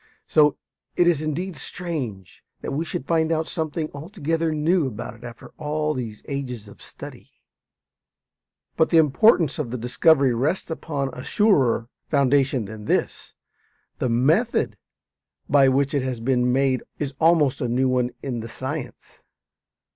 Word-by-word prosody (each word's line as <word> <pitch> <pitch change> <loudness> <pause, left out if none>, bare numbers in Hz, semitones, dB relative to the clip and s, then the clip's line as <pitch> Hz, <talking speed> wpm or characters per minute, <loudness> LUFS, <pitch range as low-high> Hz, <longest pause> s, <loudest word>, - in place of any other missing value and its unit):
So 150 -1 +4 0.4
it 175 - +4
is 170 -4 +3
indeed 165 +4 -3
strange 135 - -6 0.2
that - - -4
we 155 +4 -1
should 135 - -5
find 160 0 +1
out 160 0 0
something 160 -1 -3
altogether 165 +1 -2
new 155 +1 +2
about 105 -3 -6
it 115 +1 -16
after 120 -1 -10
all 155 0 -1
these 115 -5 -6
ages 125 -7 -5
of 100 - -15
study. - - -11 1.5
But 160 - +3
the 165 - +4
importance 160 - +4
of 140 -6 -2
the 125 - -3
discovery 125 +3 +3
rests 150 +9 -1
upon 145 -4 -3
a 125 - -8
surer 140 - +2 0.2
foundation 135 -4 +2
than 105 0 -9
this. - - -1 0.7
The 125 - 0
method 155 - +2 0.7
by 135 -2 +5
which 140 +2 +1
it 140 - +1
has 130 -2 -3
been 125 +1 +1
made 130 0 +2 0.2
is 145 -2 -3
almost 155 -5 +3
a 125 - 0
new 125 +3 +1
one 125 -1 +1
in 125 -4 -3
the 115 +1 -7
science. 130 +1 -7
140 Hz, 150 wpm, -23 LUFS, 125-160 Hz, 1.5 s, by